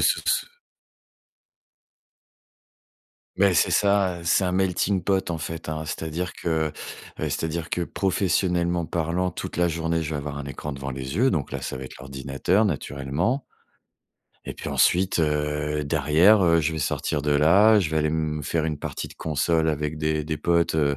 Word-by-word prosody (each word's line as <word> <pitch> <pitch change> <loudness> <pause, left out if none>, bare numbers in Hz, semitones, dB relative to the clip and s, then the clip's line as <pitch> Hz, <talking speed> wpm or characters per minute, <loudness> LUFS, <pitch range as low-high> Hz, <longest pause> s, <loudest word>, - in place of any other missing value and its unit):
ce - - +3
s - - +2 2.9
Mais, - - +4
c'est - - +3
ça, 100 -3 +2
heu, - - -11
c'est 90 +3 +3
un 90 - 0
melting-pot 95 +1 +1
en 85 - -2
fait, 80 +1 -6
hein, 80 0 -3
c'est-à-dire 80 +4 -4
que, 80 -2 -1
heu, - - -10 0.6
c'est-à-dire 80 +1 -3
que 90 - -2
professionnellement 90 -2 0
parlant, 85 +2 -1
toute - - -6
la 90 - +3
journée, 80 0 -1
je 75 - -4
vais 75 - -2
avoir 70 0 -5
un 70 - -5
écran 70 +2 -6
devant 70 0 -5
les 65 +3 -5
yeux. 125 +3 +3
Donc 75 -6 -2
là, 70 - -4
ça 65 - -4
va 65 - -7
être 65 - -9
l'ordinateur 70 - 0
naturellement 80 - -1 1.0
et - - -4
puis - - -7
ensuite, 90 -1 +2
heu, 75 0 -1
derrière 80 +8 +4
heu, 85 -1 +4
je 80 +1 0
vais 80 - -3
sortir 70 0 -1
de 75 - 0
là. 95 +9 +5
Je 85 -5 -1
vais 80 - -1
aller 75 0 +2
m 80 -1 -1
me - - -6
faire 80 +2 -1
une 75 -2 -3
partie - - -5
de - - -14
console 80 +1 0
avec 75 0 -2
des 75 0 0
des 80 0 -2
potes, 85 +1 +1
heu, 70 -2 +2
80 Hz, 180 wpm, -24 LUFS, 75-90 Hz, 2.9 s, là